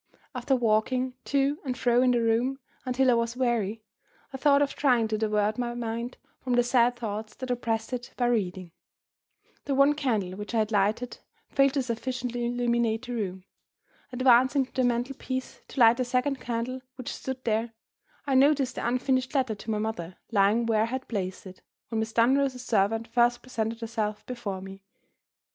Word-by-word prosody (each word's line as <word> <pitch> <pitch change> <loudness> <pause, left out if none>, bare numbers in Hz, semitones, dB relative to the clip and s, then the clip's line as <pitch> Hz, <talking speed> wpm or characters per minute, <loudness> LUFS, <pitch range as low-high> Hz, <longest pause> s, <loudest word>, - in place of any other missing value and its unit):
After 255 +1 +1
walking 250 +2 +1
to 280 +1 +1
and 255 -3 -3
fro 245 0 +3
in 255 - +4
the 240 -1 +2
room 235 +4 +1 0.3
until 255 0 +3
I - - +5
was 235 +1 0
weary, 225 -4 0 0.5
I - - -4
thought 285 +1 +4
of 280 - -2
trying 245 -6 +2
to 215 - 0
divert 215 0 +1
my 240 -1 -2
mind 235 +1 -4 0.2
from 255 - -2
the 245 0 +4
sad 245 0 +3
thoughts 220 -2 -5
that 255 -1 -5
oppressed 225 -1 -2
it 245 -1 -5
by 245 - +1
reading. 190 -7 -1 0.9
The 275 - 0
one 275 +2 +5
candle 225 -11 -1
which 205 +5 -6
I - - +3
had 215 0 +1
lighted 215 +4 0 0.3
failed 275 -1 +3
to 275 - +1
sufficiently 245 0 -3
illuminate 235 -1 0
the 245 - -5
room. 190 -5 -3 0.7
Advancing 255 +2 +4
to - - -26
the 260 - +1
mantel 245 +2 0
piece 260 0 -4
to - - -7
light 230 0 +7
the 255 - +1
second 255 +2 0
candle 240 +2 -3
which 255 -2 -5
stood 265 -1 -6
there, 225 0 0 0.5
I 280 - 0
noticed 270 0 +4
the - - -3
unfinished 255 +2 0
letter 260 -5 +2
to 215 +2 -9
my 215 - 0
mother 200 -5 -4 0.2
lying 210 +2 +3
where 220 -2 +2
I - - +3
had 260 +3 -4
placed 190 -4 -4
it, 185 0 -11 0.3
when 225 - -1
Miss 220 0 -2
Dunross's 255 +2 +2
servant 225 +1 +1
first 240 +1 +2
presented 230 -2 -3
herself 220 -2 -3
before 215 -7 -5
me. 195 0 -10
240 Hz, 185 wpm, -27 LUFS, 220-255 Hz, 0.9 s, light